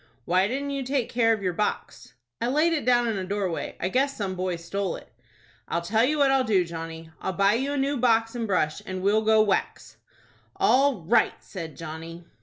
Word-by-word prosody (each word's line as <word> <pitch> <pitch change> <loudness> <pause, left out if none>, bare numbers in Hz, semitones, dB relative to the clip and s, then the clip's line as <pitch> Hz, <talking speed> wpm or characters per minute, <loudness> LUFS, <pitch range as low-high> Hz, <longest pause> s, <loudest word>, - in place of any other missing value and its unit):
"Why 185 +2 +3
didn't 280 +5 -3
you 275 -1 -2
take 260 -2 -1
care 230 -2 +2
of 215 -3 0
your 180 -1 0
box?" 210 +4 -3 0.3
"I 235 - +1
laid 305 +6 +2
it 300 -7 -1
down 240 -1 +3
in 220 -4 -1
a - - -3
doorway. 190 -3 -3
I 175 - -1
guess 275 +5 0
some 195 -3 -2
boy 185 -1 -2
stole 180 +3 -3
it." - - -13 0.5
"I'll 170 - -2
tell 220 +6 +2
you 300 +5 +2
what 280 -2 +4
I'll 270 -1 +3
do, 195 -7 +2
Johnny. 165 -1 -7
I'll 190 - -2
buy 195 +3 +3
you 270 +5 -1
a - - -1
new 275 +1 0
box 225 -2 +2
and 235 -2 -3
brush, 160 -6 0
and 185 0 -4
we'll 210 +2 +3
go 220 0 +4
whacks." 205 -3 -2 0.6
"All 265 -8 +3
right," 220 +6 +3
said 165 -7 -8
Johnny. 165 +1 -8
210 Hz, 210 wpm, -26 LUFS, 180-250 Hz, 0.6 s, what